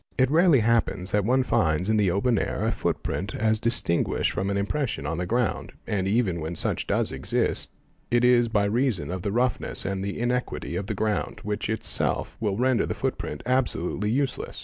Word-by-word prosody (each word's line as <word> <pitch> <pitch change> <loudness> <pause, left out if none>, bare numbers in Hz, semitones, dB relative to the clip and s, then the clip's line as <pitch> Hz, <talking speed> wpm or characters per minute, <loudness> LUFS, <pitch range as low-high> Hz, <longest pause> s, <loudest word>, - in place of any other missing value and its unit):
It 130 0 +3
rarely 165 -5 +5
hap 115 +1 +3
"pens 90 0 -6
that 105 -1 +2
one 130 +3 +3
finds 90 -8 +1
in 110 - +2
the 100 -3 +3
open 100 +5 +2
air - - -2
a - - +2
footprint 95 +1 -2
as 110 0 +1
distinguished 115 -7 +1
from 95 - -2
an 100 - 0
Mmpression 115 - -2
on 80 +2 -2
the 90 - -2
ground, 120 +1 -1
and 95 -2 -1
even 100 -5 +1
when 80 +3 -4
such - - -2
does - - 0
exist - - -1 0.4
it 120 +1 +3
is 120 -1 +5
by 105 -3 +1
reason 105 - 0
_ - - -3
of 95 - -4
the 100 +1 -2
roughness 120 +3 0
and 95 0 -2
the 100 0 -3
inequality 125 +1 -2
of 100 - -3
the 110 - -2
ground 105 +1 -2
which 105 0 -3
itself 110 -1 -1
will 100 -3 -1
render 130 0 +2
the - - -3
footprint 75 - -3
absolutely 115 -6 0
useless. 130 +3 -1
110 Hz, 200 wpm, -26 LUFS, 95-125 Hz, 0.4 s, rarely